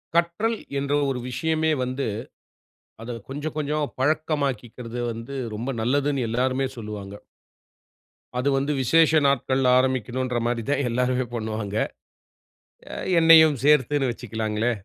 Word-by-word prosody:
கற்றல் 170 +7 +1 0.2
என்ற 140 +1 -1 0.2
ஒரு 130 -2 -2
விஷயமே 160 +4 0
வந்து 130 +2 -2 1.0
அத 120 +2 -5 0.2
கொஞ்ச, 145 +2 -6
கொஞ்ச 150 -1 -2 0.3
பழக்கமாக்கிறது 130 -5 -1
வந்து 115 +4 -7 0.2
ரொம்ப 115 +5 -4
நல்லதுன்னு 140 +3 +1
எல்லாருமே 130 +3 0
சொல்லுவாங்க. 105 -3 -7 1.2
அது 130 +3 +1
வந்து 140 +2 0
விசேஷ 160 +5 +4 0.2
நாட்கள்ல 130 -1 +2
ஆரம்பிக்கணும்ன்ற 130 -1 0
மாரி 120 -1 -1
தான் 145 - +1
எல்லாருமே 125 +1 0
பண்ணுவாங்க. 110 -2 -4 1.4
என்னையும் 160 -2 +7
சேர்த்துனு 145 -1 +3
வச்சுக்கலாங்களே. 110 0 -2
130 Hz, 105 wpm, -24 LUFS, 120-145 Hz, 1.4 s, என்னையும்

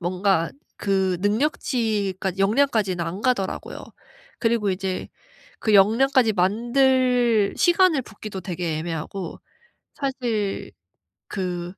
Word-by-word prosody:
뭔가 180 -1 +1 0.3
그 190 -2 0
능력치까지 205 - -1
역량까지는 210 -4 +2
안 175 +5 -5
가더라고요. 240 -7 -2 0.5
그리고 225 -3 +1
이제 185 0 -3 0.5
그 215 - +1
역량까지 230 +4 +4
만들 240 +2 +2
시간을 350 -5 +4
붓기도 210 -3 -8
되게 175 -3 -3
애매하고 165 +2 -5 0.6
사실 240 -7 -2 0.6
그 180 -2 -4
205 Hz, 235 characters per minute, -23 LUFS, 185-245 Hz, 0.6 s, 역량까지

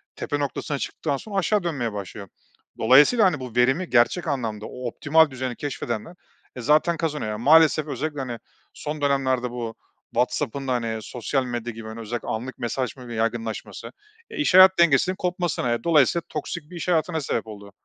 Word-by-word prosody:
tepe 145 - -3
noktasına 145 0 -3
çıktıktan 145 +1 -3
sonra 205 +7 -9
aşağı 200 +1 +1
dönmeye 135 -10 -2
başlıyor. 100 0 -7 0.5
Dolayısıyla, 145 - +6
hani, 170 -6 +2
bu 125 -3 -8
verimi 130 +9 +2
gerçek 130 +8 +2
anlamda, 115 -7 -3
o 125 -1 -6
optimal 155 +6 +3
düzeni 130 -1 -4
keşfedenler, 135 +2 -5 0.4
eee, 125 - -6
zaten 155 +6 +3
kazanıyor. 150 -9 -2
Ya, 105 - -4
maalesef 155 +4 +5
özellikle, 150 0 -4
hani, 120 -3 -4 0.3
son 150 0 -6
dönemlerde 130 -3 +1
bu 120 -2 -5 0.4
WhatsApp'ın 135 +4 -1
da 130 - +1
hani, 115 -2 -2
sosyal 125 +4 -2
medya 120 -1 -4
gibi, 110 0 -9
hani, 110 +1 -8
özellikle 115 +1 -5
anlık 125 +4 -4
mesajlaşmanın 125 +1 -4
yaygınlaşması, 115 0 -3 0.4
e, - - -9
iş 295 - +1
hayat 185 0 +8
dengesinin 170 +3 +4
kopmasına 175 -9 -1
ve 120 - -1
dolayısıyla 165 0 +3
toksik 150 +1 -5
bir - - -9
iş 170 - -5
hayatına 165 -1 +1
sebep 115 -5 -2
oldu. 100 -2 -10
135 Hz, 170 wpm, -24 LUFS, 120-160 Hz, 0.5 s, hayat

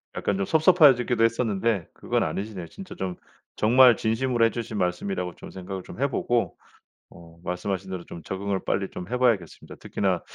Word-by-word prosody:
약간 100 - -1
좀 100 - 0
섭섭해지기도 145 - +5
했었는데 115 -4 +1
그건 - - -1
아니시네요. 100 -4 -3
진짜 190 - -10
좀 95 -2 -4 0.4
정말 120 +2 +6
진심으로 115 +1 +1
해 115 - +2
주신 115 -2 -5
말씀이라고 90 0 -2
좀 - - -11
생각을 95 0 -6
좀 110 - -11
해 140 - +2
보고 120 -1 -1 0.5
어 85 -1 -16
말씀하신 95 +1 -3
대로 90 -2 -5
좀 85 - -9
적응을 95 +3 -3
빨리 95 -1 0
좀 90 - -7
해 125 - 0
봐야겠습니다. 115 -10 0
특히나 - - -1
100 Hz, 400 characters per minute, -25 LUFS, 90-120 Hz, 0.5 s, 정말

